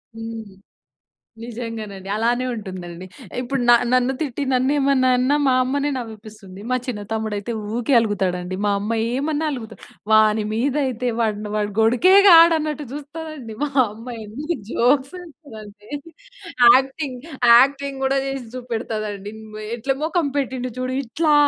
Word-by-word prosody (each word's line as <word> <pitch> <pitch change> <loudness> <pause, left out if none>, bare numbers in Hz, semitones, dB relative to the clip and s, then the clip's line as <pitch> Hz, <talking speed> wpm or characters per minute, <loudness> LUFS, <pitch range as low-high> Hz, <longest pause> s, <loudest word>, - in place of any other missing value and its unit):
హ్మ్. 225 -3 -8 0.9
నిజంగానండి. 220 -5 -7
అలానే 240 +3 +1
ఉంటుందండి. 185 -4 -8 0.3
ఇప్పుడు 255 +1 -2
న - - +9 0.2
నన్ను 255 +1 +3
తిట్టి, 285 -2 -3
నన్ను 255 +1 +2
ఏమన్నా 270 -2 +3
అన్నా, 255 +4 +2
మా 265 - +4
అమ్మనే 280 +3 -1
నవ్విపిస్తుంది. 215 -4 -9
మా 255 - +3
చిన్న 230 -5 -4
తమ్ముడు 220 -1 -2
అయితే 210 +4 -5 0.2
ఊకే 245 +3 +1
అలుగుతాడండి. 185 -4 -2
మా 205 - +2
అమ్మ 210 +3 -2 0.2
ఏమన్నా 300 +3 -1
అలుగుతా‌డు. 225 -4 -8 0.3
వాని 215 0 +5
మీద 250 +5 0
అయితే, 250 0 -2
వాడిని 210 -2 -1
వాడు 210 -1 -1
గొడికే 245 +12 +4 0.2
కాడు, 335 -1 +8
అన్నట్టు 300 -1 -3
చూస్తాదండి. 295 -4 -8
మా 290 - -3 0.2
అమ్మ 225 +3 -12 0.2
ఎన్ని 290 +11 -4
జోక్స్ 265 +4 +2
వే‌స్తది 315 -8 -12
అంటే, 205 0 -16 0.9
యాక్టింగ్, 265 0 0 0.4
యాక్టింగ్ 275 +2 +3
కూడా 270 +1 +1
చేసి 270 -3 -4
చూపెడతదండి, 215 -4 -4
ఉమ్, 215 -1 -10 0.2
"ఎట్లా 265 +4 -1
మొఖం 330 -1 0
పెట్టిండు 255 -2 -3
చూడు, 255 0 -2
ఇట్లా 300 +6 +1
245 Hz, 140 wpm, -21 LUFS, 215-275 Hz, 0.9 s, న